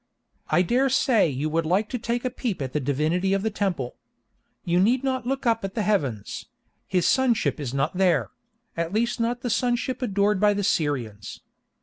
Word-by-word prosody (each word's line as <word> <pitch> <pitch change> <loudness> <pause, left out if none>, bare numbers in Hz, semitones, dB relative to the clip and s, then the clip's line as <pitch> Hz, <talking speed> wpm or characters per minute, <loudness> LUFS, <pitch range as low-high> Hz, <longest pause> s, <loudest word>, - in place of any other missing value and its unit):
I 180 - +4
dare 255 +8 +2
say 250 - +3
you 140 +2 -2
would 165 0 0
like 195 +6 +2
to 250 - -3
take 235 +2 -2
a 255 - 0
peep 235 -5 -3
at 130 -3 -4
the 150 - +1
divinity 155 +8 0
of 195 0 0
the 220 - 0
temple. 180 -12 -2 0.7
You 175 0 +2
need 240 +7 +3
not 260 -2 -1
look 270 +1 -2
up 230 -2 +2
at 195 +1 -5
the 220 - 0
heavens; 140 - -1 0.4
his 180 -2 +1
Sunship 250 -10 +2
is 135 -5 -3
not 140 +5 -1
there—at 190 0 -2
least 235 +3 0
not 235 +1 -1
the 245 - -2
Sunship 245 +3 0
adored 205 -3 +1
by 205 0 +4
the 205 - -1
Syrians. 125 - -2
200 Hz, 190 wpm, -25 LUFS, 160-235 Hz, 0.7 s, I